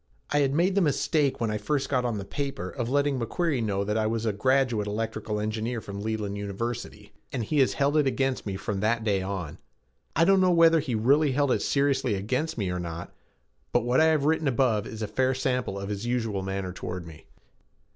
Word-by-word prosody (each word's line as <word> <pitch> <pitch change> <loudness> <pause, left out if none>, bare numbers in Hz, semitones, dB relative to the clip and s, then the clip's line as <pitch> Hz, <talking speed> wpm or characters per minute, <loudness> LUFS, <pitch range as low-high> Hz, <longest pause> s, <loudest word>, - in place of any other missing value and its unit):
I 145 - +3
had 140 -1 +2
made 180 +4 +3
the 200 - +3
mistake 150 -2 +1
when 115 -2 0
I 105 - -2
first 140 +5 -1
got 125 -3 0
on 120 -3 -1
the 100 - -5
paper 140 +2 -4
of 120 -3 -3
letting 140 0 +1
McQuarrie 140 +3 -1
know 100 -2 0
that 105 +2 0
I 110 - +1
was 115 0 -1
a 110 - +1
graduate 125 -1 +1
electrical 105 0 -3
engineer 110 +3 -2
from 100 -2 -7
Leland 105 -2 -2
University, 115 +4 -5 0.2
and 125 - -2
he 145 +7 0
had 135 - +4
held 140 +2 +1
it 150 -2 +3
against 135 -2 -1
me 100 - -2
from 95 +1 -3
that 110 +2 +1
day 100 -3 +1
on. 95 -5 -5 0.6
I 165 - +4
don't 195 0 +5
know 185 - +4
whether 165 -1 +6
he 135 -6 -2
really 140 +6 +3
held 140 0 +2
it - - +1
seriously 135 -5 +1
against 130 +11 -2
me 100 -5 -1
or 90 - -2
not, 85 0 -6 0.6
but 120 - +3
what 125 +5 +3
I - - +6
have 155 -3 +3
written 160 0 +2
above 115 -5 +1
is 110 0 -6
a - - -2
fair 130 +5 +1
sample 125 -6 -1
of 100 0 -5
his 100 0 -4
usual 115 -5 -1
manner 95 -1 -3
toward 90 -1 -5
me. 80 -2 -13
120 Hz, 220 wpm, -27 LUFS, 105-140 Hz, 0.6 s, whether